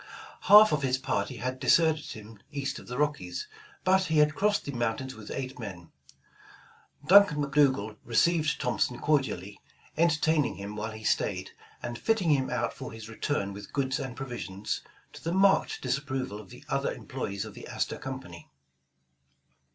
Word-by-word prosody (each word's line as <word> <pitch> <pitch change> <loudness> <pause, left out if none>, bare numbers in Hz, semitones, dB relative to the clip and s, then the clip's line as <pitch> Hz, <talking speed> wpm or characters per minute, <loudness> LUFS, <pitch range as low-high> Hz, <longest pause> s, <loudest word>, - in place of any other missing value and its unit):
Half 210 +1 +10
of 150 - +1
his 130 -1 +1
party 130 -1 -2
had 130 +3 -3
deserted 160 -1 +3
him 110 0 -10
east 140 -1 -3
of - - -14
the 125 - -5
Rockies, 140 -13 -1 0.4
but 190 0 +4
he 160 -2 0
had 150 0 +5
crossed 205 +4 +1
the 140 - -3
mountains 120 +1 -2
with 110 -1 -11
eight 130 -1 -5
men. 90 -7 -8 1.1
Duncan 190 -2 +7
McDougal 135 -7 +2
received 155 +6 +2
Thompson 125 -1 0
cordially, 120 -10 -1 0.4
entertaining 160 -6 +2
him 100 +2 -7
while 105 +1 -3
he 110 0 -10
staid, 95 -3 0 0.3
and 120 0 -4
fitting 215 -8 +2
him 135 -3 +2
out - - -1
for 130 - -8
his 110 -1 -9
return 110 -3 -2
with 100 0 -10
goods 135 0 0
and 130 -3 -5
provisions, 120 -7 -4 0.3
to - - -12
the 165 - -1
marked 195 +1 +3
disapproval 130 -4 -2
of 95 - -16 0.2
other - - 0
employes 100 0 -5
of - - -9
the - - -10
Astor - - -3
Company. 130 -10 -8
130 Hz, 160 wpm, -29 LUFS, 110-150 Hz, 1.1 s, Half